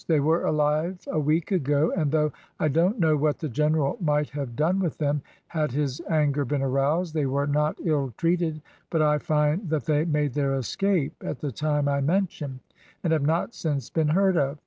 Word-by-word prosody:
They 160 -3 +3
were 160 +4 +2
alive 155 +4 +1
a 155 - 0
week 155 +5 0
ago, 145 -3 +2
and 155 -6 0
though 150 -1 +2 0.3
I 155 - +2
don't 170 - +2
know 160 -3 +4
what 150 0 +1
the 155 - -4
general 150 +2 +1
might 150 -2 +1
have 140 -5 -5
done 170 +8 +1
with 175 -6 -1
them, 145 -1 0 0.2
had 155 -6 -2
his 140 0 -1
anger 150 -3 +2
been 140 +1 -1
aroused, 145 +6 +1
they 150 -4 0
were 140 +2 0
not 150 +1 0
ill 145 -5 0
treated, 165 -3 0 0.3
but 160 -2 +2
I 150 0 +3
find 150 +5 0
that 155 -4 -1
they 150 -1 +2
made 150 -4 0
their 140 -2 0
escape 160 - 0
at - - -4
the 145 0 -4
time 150 +2 0
I 140 0 +1
mention, 150 -5 -1 0.4
and 165 -3 +2
have 155 - +2
not 165 +8 0
since 145 - -3
been 160 -2 +1
heard 190 +3 +3
of. 140 0 0
150 Hz, 200 wpm, -26 LUFS, 145-160 Hz, 0.4 s, know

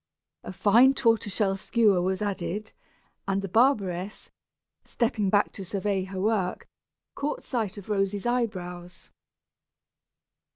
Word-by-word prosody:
A - - -7
fine 235 +8 +5
tortoise 225 -6 +1
shell 195 -3 +1
skewer 205 -2 +2
was 190 +2 -1
added, 205 +1 -3 0.5
and 195 0 0
the - - -2
barberess, 200 -4 +1 0.5
stepping 225 -4 -1
back 205 +1 +2
to 195 - -8
survey 195 0 -2
her 190 0 -6
work, 195 -3 -1 0.5
caught 295 +1 -3
sight 220 -6 -3
of 200 - -10
Rosy's 200 0 -1
eyebrows. 185 -8 -3
200 Hz, 120 wpm, -27 LUFS, 190-225 Hz, 0.5 s, fine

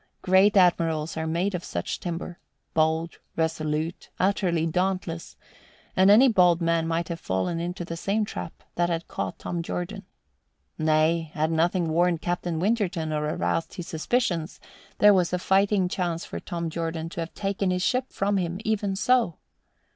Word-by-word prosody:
Great 190 +3 +5
admirals 165 -4 +3
are 160 0 -2
made 175 +5 0
of 180 -1 -3
such 85 - -4
timber 175 0 -5 0.3
bold, 160 +1 +1 0.2
resolute, 160 0 -2
utterly 180 -4 +1
dauntless 180 -1 -2 0.6
and 190 +1 +5
any 225 +6 +8
bold 180 -7 +4
man 165 -1 +1
might 165 0 -1
have 170 -1 -4
fallen 95 - -1
into 175 +1 -4
the 165 - -5
same 205 +5 0
trap 90 - -7
that 175 0 +1
had 165 -1 -2
caught 95 -1 -4
Tom 175 -1 -3
Jordan. 180 +4 -4 0.7
(Nay, 155 +1 +2
had 155 +1 +1
nothing 170 +2 +1
warned 170 +1 +2
Captain 175 -1 -2
Winterton 185 -6 0
or 150 0 -1
aroused 165 - -1
his 175 - -6
suspicions, 175 -1 -1 0.4
there 210 0 +7
was 180 -2 +2
a - - +2
fighting 195 +1 +2
chance 175 -2 -2
for - - -6
Tom 170 -3 -4
Jordan 165 0 -3
to 170 - -7
have 165 0 -5
taken 195 -1 -1
his 180 0 0
ship 255 0 +1
from 200 +1 0
him 175 0 -2
even 205 -3 0
so.) 235 -4 +2
175 Hz, 160 wpm, -26 LUFS, 165-190 Hz, 0.7 s, any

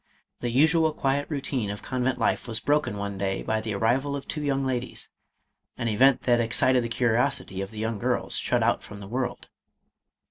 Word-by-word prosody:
The 120 - -2
usual 160 +5 +4
quiet 140 0 0
routine 135 -7 -2
of 100 0 -5
con 130 -1 -2
vent 130 0 +1
life - - 0
was 110 -1 -3
broken 145 -4 +1
one 100 -1 -4
day 95 -1 -1
by 110 0 0
the 110 -2 -3
arrival 130 +7 +1
of 140 - -6
two 150 - -3
young 135 -2 0
ladies 125 -1 -3 0.3
— - - -50
an 115 - -2
event 130 +5 +4
that 120 -1 +3
excited 125 +2 +3
the 115 - -3
curiosity 120 -3 +1
of 95 - -4
the 110 - -12
young 110 0 -2
girls, - - 0
shut - - +1
out - - +2
from 100 - -10
the 100 - -9
world. 120 +2 -3
120 Hz, 205 wpm, -26 LUFS, 110-135 Hz, 0.3 s, usual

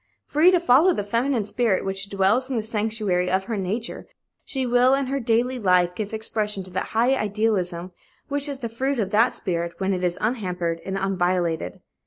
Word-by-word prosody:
Free 310 +5 +4
to 365 -1 +4
follow 335 +3 +5
the 205 - -2
feminine 230 +2 0
spirit, 220 -3 0
which 195 +1 -4
dwells 200 +7 +2
in 260 - -1
the 220 - -1
sanctuary 210 -4 -1
of 190 +1 +1
her 225 +3 -4
nature, 205 +4 -4 0.4
she 265 -3 -2
will, 245 +2 +4
in 275 0 -1
her 275 +2 -2
daily 245 +1 +1
life, 180 -4 +3
give 205 +2 -5
expression 215 -2 -2
to 185 - -10
that 185 - -2
high 245 +4 +4
idealism 200 -6 -1 0.4
which 285 0 -2
is 275 -1 -5
the 235 - -2
fruit 265 +4 -1
of 200 -4 -1
that 230 +4 +3
spirit 170 -3 -3
when 195 0 0
it 185 -1 -3
is 175 -1 0
unhampered 180 -7 -2
and 195 0 -2
unviolated. 180 -3 -1
215 Hz, 195 wpm, -24 LUFS, 185-245 Hz, 0.4 s, follow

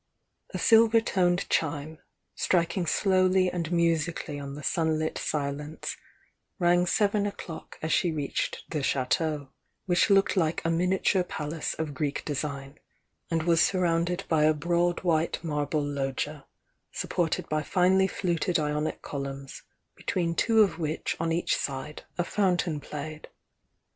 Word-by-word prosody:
A - - -3
silver 225 0 +6
toned 180 -5 +1
chime, 155 0 -1 0.3
striking 170 0 +1
slowly 185 +1 +3
and 170 -2 -3
musically 165 -3 0
on 140 0 -6
the 150 - -8
sunlit 160 -1 0
silence, 150 +1 -3 0.6
rang 175 -1 +3
seven 205 +1 +2
o'clock 175 -5 -8
as 160 - 0
she 175 - +2
reached 145 -3 -2
the 150 - -1
Chateau, 140 +2 0 0.4
which 175 +1 +3
looked 195 0 +4
like 165 -3 0
a 165 - +2
miniature 180 +2 +2
palace 155 -2 -4
of 160 -2 -3
Greek 145 +1 -2
design, 140 -1 -4 0.5
and 165 -2 0
was 165 0 +4
sur 185 0 +2
rounded 175 +1 +1
with 155 -2 +3
a 155 - +2
broad 170 +2 +1
white 165 -2 +1
marble 150 -1 -1
loggia, 140 +1 -3 0.4
support 170 -3 -1
ed - - -7
by 155 0 0
finely 185 +3 +3
fluted 180 -1 0
Ionic 150 0 -2
columns, 140 -1 -6 0.3
between 170 -2 -1
two 220 +5 +4
of 195 - -1
which 155 -1 -2
on 165 0 0
each 170 +2 +1
side 140 +2 -4 0.2
a 175 - +2
fountain 180 -4 0
played. 150 +2 -7
165 Hz, 140 wpm, -28 LUFS, 150-180 Hz, 0.6 s, silver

